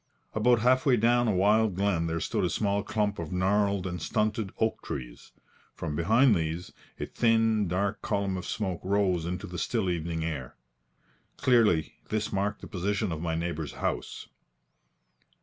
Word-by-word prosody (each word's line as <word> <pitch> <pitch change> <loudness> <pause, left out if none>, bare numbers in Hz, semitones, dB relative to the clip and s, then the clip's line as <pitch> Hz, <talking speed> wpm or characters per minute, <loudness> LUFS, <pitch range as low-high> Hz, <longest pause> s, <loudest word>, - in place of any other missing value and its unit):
About 115 +2 +3
half 130 +2 +4
way 125 -3 +5
down 120 +2 +3
a - - +3
wild 105 +1 +3
glen 95 -4 +1
there 80 0 -1
stood 105 +4 -1
a 90 - +2
small 100 +1 0
clump 105 -1 -1
of 80 -2 -5
gnarled 100 +1 +1
and 90 -2 -4
stunted 105 0 -1
oak 110 0 0
trees. - - -7 0.4
From 75 - -4
behind 115 - +4
these, 85 +1 -3 0.3
a - - -2
thin 115 -3 +2
dark 100 +4 -1
column 100 -2 -1
of 90 - -5
smoke 100 -7 -3
rose 95 -4 +1
into 90 +1 -4
the 90 0 -6
still 110 -7 0
evening 80 -1 -2
air. 70 -6 -5 0.8
Clearly 110 -11 +3
this 110 -1 -2
marked 100 +1 -1
the - - -8
position 100 +1 -1
of 80 -1 -4
my 80 -1 -1
neighbour's 80 -3 -3
house. - - -3
100 Hz, 165 wpm, -28 LUFS, 85-110 Hz, 0.8 s, way